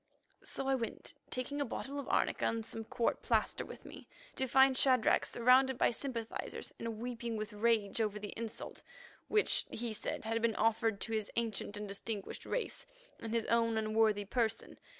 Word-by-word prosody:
So 270 - -4
I 270 - +3
went, 235 -4 -3 0.2
taking 285 +3 -2
a - - +1
bottle 275 +3 -4
of 280 - -6
arnica - - +2
and 225 -1 0
some 225 0 -5
court 230 - 0
plaster - - +1
with - - -11
me, - - -11 0.3
to 265 - 0
find 265 +1 +6
Shadrach 255 -3 +4
surrounded 255 +2 +4
by - - +4
sympathizers 235 -3 -4
and 230 -1 -4
weeping 235 -1 -3
with 215 0 -4
rage 220 0 +2
over 210 -1 0
the 205 0 -6
insult, 230 -1 -6 0.5
which, 425 0 +3
he 235 -1 -3
said, 215 - -4
had 225 +1 0
been 230 -1 +2
offered 225 -2 +2
to - - -4
his 215 -2 -1
ancient 220 -3 -2
and 210 0 -5
distinguished 200 +1 -5
race - - -3 0.3
in 225 - -5
his 230 0 0
own 230 0 +2
unworthy 215 -1 +2
person. 225 +1 -1
230 Hz, 175 wpm, -34 LUFS, 220-250 Hz, 0.5 s, find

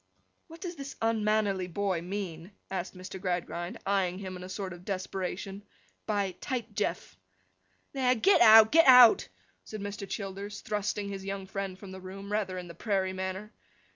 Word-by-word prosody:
'What 330 0 -13
does 355 -3 -5
this 275 0 -7
unmannerly 215 -4 +1
boy 185 -1 -1
mean,' 180 -1 -6 0.2
asked 185 0 -4
Mr. 185 0 -8
Gradgrind, 175 -1 -3
eyeing 190 -2 +1
him 190 -1 -6
in 180 - -8
a 185 - -8
sort 190 -1 -5
of 175 0 -12
desperation, 190 0 -4 0.5
'by 200 -3 0
Tight 240 -5 -4
Jeff?' 95 - -3 0.7
'There! 255 -2 +2
Get 385 - +4
out, 220 0 +9
get 330 -1 +6
out!' 250 -3 +8 0.4
said 215 - -8
Mr. 205 0 -6
Childers, 200 +1 -5
thrusting 205 -1 -2
his 195 -1 -6
young 195 0 -4
friend 195 -1 -5
from 195 -1 -10
the 190 0 -9
room, 195 +2 -8
rather 200 -3 -1
in 180 -1 -6
the 170 - -9
prairie 190 -3 -1
manner. 190 +3 -5
195 Hz, 170 wpm, -29 LUFS, 185-210 Hz, 0.7 s, out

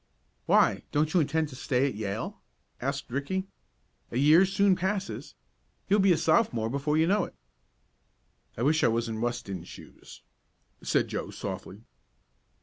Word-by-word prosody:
"Why, - - +4
don't 155 +1 +1
you 180 - +4
intend 155 0 0
to 130 - -10
stay 130 0 0
at 135 - -3
Yale?" 105 0 -4 0.4
asked 140 0 -3
Ricky. 165 +9 -2 0.6
"A - - -4
year 155 +7 +6
soon 195 0 +3
passes. 190 +2 -3 0.5
You'll 205 +2 +3
be 195 -1 +5
a 170 - +4
Sophomore 115 -9 +2
before 145 +3 0
you 160 - +4
know 200 +4 +2
it." - - -13 1.2
"I 115 - -2
wish 155 +3 +3
I - - +6
was 115 0 0
in 110 -1 -4
Weston's 110 -7 -3
shoes," - - -13 0.6
said - - +1
Joe - - -4
softly. 100 +4 -7
145 Hz, 150 wpm, -28 LUFS, 120-180 Hz, 1.2 s, year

